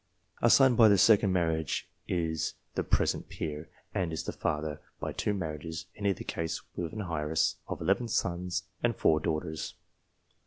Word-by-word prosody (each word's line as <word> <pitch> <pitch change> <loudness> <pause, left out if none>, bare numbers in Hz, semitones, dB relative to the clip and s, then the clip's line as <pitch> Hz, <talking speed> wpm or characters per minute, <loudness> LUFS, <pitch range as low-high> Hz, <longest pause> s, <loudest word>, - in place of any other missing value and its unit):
A 120 - +5
son 130 0 +6
by 115 -1 +8
the 100 -1 +6
second 100 0 +6
marriage 80 -4 0 0.2
is 80 -3 -1 0.2
the - - -1
present - - +1
peer, 75 0 -5 0.2
and 90 -3 0
is 80 - -3
the - - -3
father, 75 0 -2 0.2
by - - -3
two - - -1
marriages 80 -3 -4
in 100 - -6
neither 100 -4 +1
case 80 0 -3 0.2
with 85 -2 -3
an 105 -1 -4
heiress 80 -3 0
of - - -5
eleven 100 +8 +2
sons 90 -4 -1 0.2
and - - +1
four 80 -1 +3
daughters. 80 0 -3
85 Hz, 165 wpm, -30 LUFS, 80-100 Hz, 0.2 s, by